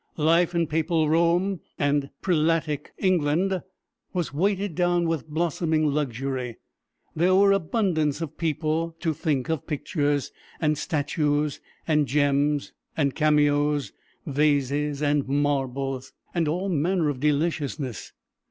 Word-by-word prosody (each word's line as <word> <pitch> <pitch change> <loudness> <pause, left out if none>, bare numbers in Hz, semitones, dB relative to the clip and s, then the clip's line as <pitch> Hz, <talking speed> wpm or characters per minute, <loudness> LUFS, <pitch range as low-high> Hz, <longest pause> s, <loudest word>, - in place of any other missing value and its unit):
Life 170 +3 +3
in 170 -1 +2
papal 160 0 +1
Rome 170 +3 +2 0.2
and 145 -1 +1
prelatic 160 -4 +1
England 185 +1 +1 0.5
was 175 -6 -2
weighed 195 +3 0
down 175 0 +1
with 165 -2 -2
blossoming 160 0 0
luxury. 135 -4 -2 0.6
There 180 +4 +3
were 200 +1 +5
abundance 170 - +1
of 165 -3 -5
people 165 0 -1
to 160 -1 0
think 145 -4 -1
of 160 -3 -2
pictures, 145 -2 -1 0.3
and 155 -2 +2
statues, 150 -1 -1 0.3
and 150 -3 +2
gems, 145 +1 +1 0.2
and 140 -4 +1
cameos, 150 -1 +2 0.3
vases 145 0 +1
and 145 -1 +1
marbles, 135 -2 -1 0.2
and 170 -3 +1
all 180 +6 -1
manner 175 0 +1
of 140 -3 -3
deliciousness. 145 - -1
150 Hz, 115 wpm, -25 LUFS, 145-170 Hz, 0.6 s, were